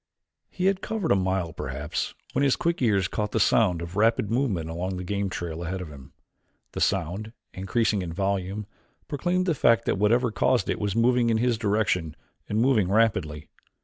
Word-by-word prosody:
He 185 - -3
had 195 -1 +2
covered 215 -7 -2
a - - +6
mile 95 -3 -1
perhaps 65 +4 -4 0.2
when - - +1
his 135 -2 +3
quick 170 -3 -1
ears 100 -7 +2
caught 105 +2 -3
the 110 - +1
sound 90 -5 +3
of 85 +2 -8
rapid 110 0 +2
movement 115 - 0
along 90 +3 -3
the 90 - -5
game 100 +1 -2
trail 85 -2 -5
ahead 90 +3 -3
of 90 -4 -7
him. 70 -2 -13 0.6
The - - -5
sound, 95 +5 -1 0.2
increasing 100 +2 0
in 85 -2 -5
volume, 100 +2 -2 0.4
proclaimed 175 +5 0
the 175 - +2
fact 115 -4 +3
that - - 0
whatever 115 +3 +3
caused 125 +3 +1
it - - -3
was 100 -2 -2
moving 120 +1 +3
in 115 - +2
his 120 +1 +2
direction 105 -7 0 0.3
and 105 - 0
moving 115 -7 +3
rapidly. 95 -9 +1
105 Hz, 185 wpm, -26 LUFS, 90-115 Hz, 0.6 s, a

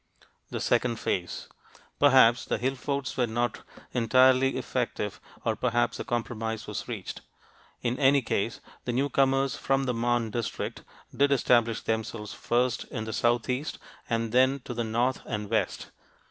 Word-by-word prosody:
THE - - -4
SECOND 120 -2 +1
PHASE 90 -1 -2 0.5
Perhaps 130 -4 +6
the - - -1
hill 130 +2 0
forts 140 0 -3
were 125 -2 +1
not 120 +1 -1 0.3
entirely 130 +2 +4
effective 125 -5 -3 0.2
or - - +1
perhaps - - 0
a - - -2
compromise 115 -2 -3
was - - -5
reached. - - -6 0.6
In 120 +1 -1
any 140 -1 +5
case, 115 +1 -1 0.2
the 120 - -1
newcomers 135 +1 +2
from 135 0 +1
the 125 -2 0
Marne 120 -1 0
district 115 0 -3 0.3
did 140 0 +3
establish 120 -4 +3
themselves, 110 -1 -3
first 125 +2 0
in 110 -4 -5
the 110 0 -5
southeast 120 +5 0 0.3
and 115 -1 0
then 130 +3 +3
to 120 - -6
the 120 0 -2
north 120 +4 0
and 105 -2 -4
west. 110 - -1
120 Hz, 145 wpm, -28 LUFS, 115-130 Hz, 0.6 s, Perhaps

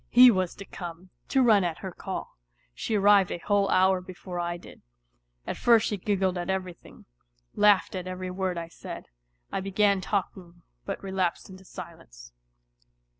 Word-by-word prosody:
He 250 +1 +9
was 185 -4 -1
to 200 - -9
come, 175 0 -9 0.2
to 265 -1 +3
run 215 -5 +5
at 170 -2 -2
her 190 - -6
call. 190 +2 -6 0.4
She 220 - -2
arrived 200 -2 +5
a - - -3
whole 200 +2 +1
hour 185 0 +3
before 180 0 -7
I 175 0 -2
did. - - -14 0.6
At - - -4
first 230 -2 +4
she 210 - -1
giggled 190 -2 0
at 175 - -4
everything, 185 -2 -5 0.5
laughed 205 -1 +4
at 185 -1 -5
every 185 0 -5
word 185 -1 -2
I 165 0 -4
said. 170 - -9 0.4
I - - -1
began 195 0 +2
talking, 180 -3 -4 0.2
but - - -5
relapsed 190 -1 -2
into 190 0 -13
silence. - - -11
185 Hz, 165 wpm, -27 LUFS, 180-200 Hz, 0.6 s, He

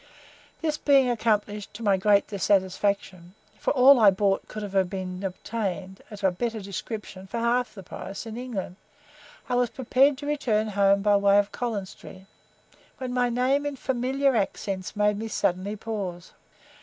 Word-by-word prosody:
This 310 -1 -1
being 270 -3 +4
accomplished 210 -3 -1
to 230 - -7
my 200 -2 +4
great 200 +1 +3
dissatisfaction 190 -2 -1 0.2
for - - -1
all 265 0 +7
I 215 -3 +8
bought 195 0 0
could 215 0 -6
have 195 -2 0
been 185 -1 -5
obtained, 190 -1 -4
of 210 -1 -10
a 190 - +4
better 225 +4 -3
description, 200 -1 -7
for 235 - -5
half 240 +1 0
the 195 - -9
price 195 +4 -7
in 225 -1 -7
England 230 -7 -5 0.7
I 250 - -2
was 245 -1 +2
preparing 265 +3 +2
to 285 +2 -9
return 230 -8 0
home 200 -1 +3
by 205 -1 +4
way 200 0 +4
of 205 0 +2
Collins 215 -6 -3
Street, 190 0 -13 0.7
when 255 -1 -4
my 245 -1 +2
name 255 +4 +1
in 290 -1 -3
familiar 265 +1 0
accents 195 -2 -2
made 210 0 +2
me 225 - -4
suddenly 195 -1 -1
pause. 200 -5 -5
210 Hz, 165 wpm, -26 LUFS, 195-245 Hz, 0.7 s, I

